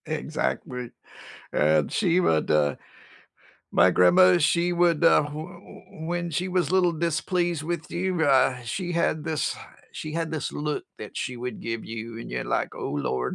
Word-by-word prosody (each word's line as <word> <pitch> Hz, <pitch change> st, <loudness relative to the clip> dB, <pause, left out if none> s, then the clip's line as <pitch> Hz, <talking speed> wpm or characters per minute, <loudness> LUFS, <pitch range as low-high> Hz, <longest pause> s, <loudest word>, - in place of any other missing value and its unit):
Exactly. 145 Hz, -5 st, -3 dB, 0.6 s
And 75 Hz, -1 st, +2 dB
she 180 Hz, -4 st, +2 dB
would, 80 Hz, -, +1 dB
uh 75 Hz, -2 st, +2 dB, 1.0 s
my -, -, +6 dB
grandma, 180 Hz, -, +6 dB
she 170 Hz, +2 st, +2 dB
would, 170 Hz, -2 st, +2 dB
uh, 165 Hz, -, +6 dB
wh 145 Hz, 0 st, -6 dB
w 175 Hz, +4 st, -10 dB, 0.2 s
when 175 Hz, 0 st, -2 dB
she 175 Hz, +4 st, -1 dB
was 180 Hz, -1 st, 0 dB
little 180 Hz, -2 st, +3 dB
displeased 170 Hz, 0 st, -1 dB
with 160 Hz, -1 st, -4 dB
you, 180 Hz, -1 st, -1 dB
uh, 130 Hz, -2 st, +3 dB
she 175 Hz, -, -3 dB
had 160 Hz, -2 st, 0 dB
this 160 Hz, -2 st, -1 dB, 0.4 s
she 155 Hz, -, -6 dB
had 165 Hz, 0 st, -2 dB
this 160 Hz, -2 st, -3 dB
look 150 Hz, 0 st, -3 dB
that -, -, -9 dB
she 125 Hz, -, -3 dB
would 125 Hz, -1 st, -5 dB
give 115 Hz, -1 st, -4 dB
you, 115 Hz, 0 st, -7 dB
and -, -, -8 dB
you're -, -, -3 dB
like, -, -, -1 dB
"Oh -, -, -4 dB
lord, 65 Hz, -3 st, -2 dB
155 Hz, 165 wpm, -25 LUFS, 125-175 Hz, 1.0 s, my